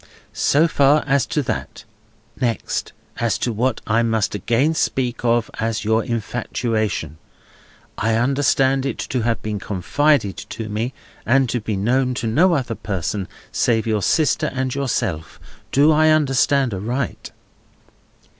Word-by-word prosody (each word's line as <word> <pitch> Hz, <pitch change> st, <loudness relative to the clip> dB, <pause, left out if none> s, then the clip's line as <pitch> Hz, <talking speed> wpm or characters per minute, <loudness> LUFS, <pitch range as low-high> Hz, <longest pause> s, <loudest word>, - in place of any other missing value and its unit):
So 155 Hz, +4 st, +3 dB
far, 145 Hz, -1 st, +3 dB
as 135 Hz, -4 st, +2 dB
to 150 Hz, -, -1 dB
that; -, -, -4 dB, 0.5 s
next 120 Hz, -3 st, -2 dB, 0.3 s
as 115 Hz, -2 st, 0 dB
to 120 Hz, -, -2 dB
what 120 Hz, +2 st, 0 dB
I 115 Hz, +2 st, +2 dB
must 115 Hz, -2 st, 0 dB
again 120 Hz, -, +1 dB
speak 125 Hz, -6 st, -1 dB
of 120 Hz, -1 st, +1 dB
as 110 Hz, -1 st, -2 dB
your 110 Hz, +1 st, +2 dB
infatuation. 110 Hz, -, -2 dB, 0.8 s
I 110 Hz, +2 st, +1 dB
understand 135 Hz, +2 st, +2 dB
it 135 Hz, -, -3 dB
to 125 Hz, -, -2 dB
have 115 Hz, 0 st, 0 dB
been 105 Hz, -1 st, -3 dB
confided 105 Hz, -, +1 dB
to 110 Hz, -1 st, -6 dB
me, 110 Hz, +4 st, -2 dB, 0.3 s
and 130 Hz, +2 st, +3 dB
to 120 Hz, 0 st, -1 dB
be 105 Hz, 0 st, -2 dB
known 125 Hz, +5 st, +1 dB
to 120 Hz, -, -3 dB
no 165 Hz, +11 st, +3 dB
other 130 Hz, -5 st, -2 dB
person 95 Hz, -2 st, -3 dB, 0.2 s
save 115 Hz, -2 st, +1 dB
your 110 Hz, -2 st, 0 dB
sister 155 Hz, -, +2 dB
and 130 Hz, -1 st, -1 dB
yourself. 95 Hz, -, -2 dB, 0.3 s
Do 145 Hz, +3 st, +5 dB
I 155 Hz, +1 st, +4 dB
understand 140 Hz, -4 st, +2 dB
aright?" 115 Hz, +7 st, -3 dB
120 Hz, 140 wpm, -21 LUFS, 110-135 Hz, 0.8 s, Do